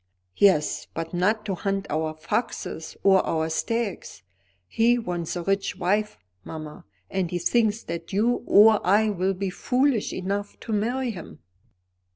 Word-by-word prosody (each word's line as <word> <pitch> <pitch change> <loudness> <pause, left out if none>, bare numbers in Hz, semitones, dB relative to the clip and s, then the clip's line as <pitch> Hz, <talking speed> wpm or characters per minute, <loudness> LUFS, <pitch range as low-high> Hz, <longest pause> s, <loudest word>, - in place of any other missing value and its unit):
"Yes, 185 -7 +3
but 165 +1 -4
not 210 +5 +1
to 200 - -1
hunt 195 +1 -2
our 155 +1 -1
foxes 160 0 -4
or 190 -1 +5
our 160 0 -1
stags. 225 - -3 0.4
He 235 - +3
wants 175 -7 -3
a 175 - -3
rich 195 +1 0
wife, 205 +3 0 0.3
mamma. 155 -1 -8 0.3
And 185 -3 -1
he 175 - -2
thinks 220 +4 +1
that 165 0 -6
you 225 +5 +1
or 215 +1 +6
I 210 +4 +3
will 190 0 0
be 190 0 -3
foolish 250 +2 +1
enough 200 +2 -4
to 225 - -4
marry 240 +4 0
him." 160 - -10
195 Hz, 150 wpm, -25 LUFS, 175-220 Hz, 0.4 s, or